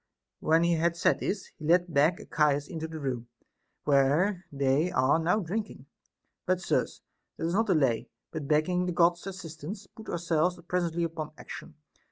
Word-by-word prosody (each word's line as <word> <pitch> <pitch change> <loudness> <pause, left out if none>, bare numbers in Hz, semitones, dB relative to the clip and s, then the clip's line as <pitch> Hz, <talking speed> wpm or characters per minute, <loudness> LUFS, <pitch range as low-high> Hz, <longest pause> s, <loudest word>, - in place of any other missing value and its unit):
When 160 +2 +3
he 170 0 +3
had 170 +1 +1
said - - +3
this, 195 -1 -3
he 155 - -7
led 175 +1 +3
back 150 +5 +4
Archias 145 -2 +1
into 160 -3 -5
the 160 0 -7
room, 125 -4 -3 0.6
where 150 +7 +3
they 140 +4 +2
are 130 0 +3
now 180 +6 +2
drinking. 205 +5 -4 0.6
But, 185 -1 +2
sirs, 185 - -1 0.3
let 165 - -1
us - - -2
not 225 +4 +2
delay, 135 - +2 0.2
but 155 -3 -5
begging 180 +5 +2
the 180 - -1
God's 175 +2 +3
assistance, 185 +1 -7
put 220 +3 -12
ourselves 175 +1 0
presently 170 -2 0
upon 160 -2 -4
action. 165 - -9
165 Hz, 165 wpm, -29 LUFS, 150-180 Hz, 0.6 s, back